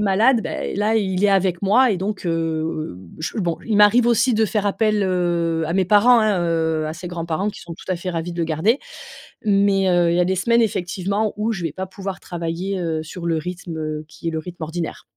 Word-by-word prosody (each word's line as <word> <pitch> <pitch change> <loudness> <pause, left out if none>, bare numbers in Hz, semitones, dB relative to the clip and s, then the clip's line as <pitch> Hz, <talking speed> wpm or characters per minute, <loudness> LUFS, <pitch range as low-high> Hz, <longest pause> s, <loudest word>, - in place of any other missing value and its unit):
malade, 220 +4 +3
beh, - - -4
là, 210 +2 +1
il 195 -2 +1
est 200 - +5
avec 190 -2 +1
moi 230 +6 +4
et 195 - +1
donc, 195 +1 -4
heu, 170 - +1
heu, 160 - -2 0.2
je 160 +8 -4
bon, 175 -5 0
il 220 -2 0
m'arrive 225 +4 +6
aussi 240 +1 +3
de 220 - +3
faire 210 -1 -1
appel, 215 0 +1
heu, 170 -3 0
à 165 - -2
mes 185 -1 +1
parents, 230 +4 +6
hein, 215 -3 +2
heu, 160 -2 0
à 155 - -3
ses 175 +2 -7
grands-parents 170 +3 -2
qui - - -7
sont 170 - -8
tout 180 - -9
à 180 - +1
fait 180 +1 -4
ravis 170 +1 -3
de - - -9
le 170 - +1
garder, 165 - +1 0.7
mais, 200 -2 +3
heu, 175 -1 +3
il 170 - +1
y - - +3
a 180 - +4
des 190 +1 0
semaines, 235 +5 +3
effectivement, 200 +1 -1
où 215 +2 0
je 195 -5 -5
vais 160 - -2
pas 190 - -4
pouvoir 195 0 -6
travailler, 175 +3 -4
heu, 160 -2 -2
sur 170 +2 -7
le 165 -1 +1
rythme, 175 +1 -5
heu, 155 -1 -4
qui 160 - -11
est - - 0
le 160 - -3
rythme 170 +1 -8
ordinaire. 165 +1 -4
180 Hz, 240 wpm, -21 LUFS, 165-205 Hz, 0.7 s, m'arrive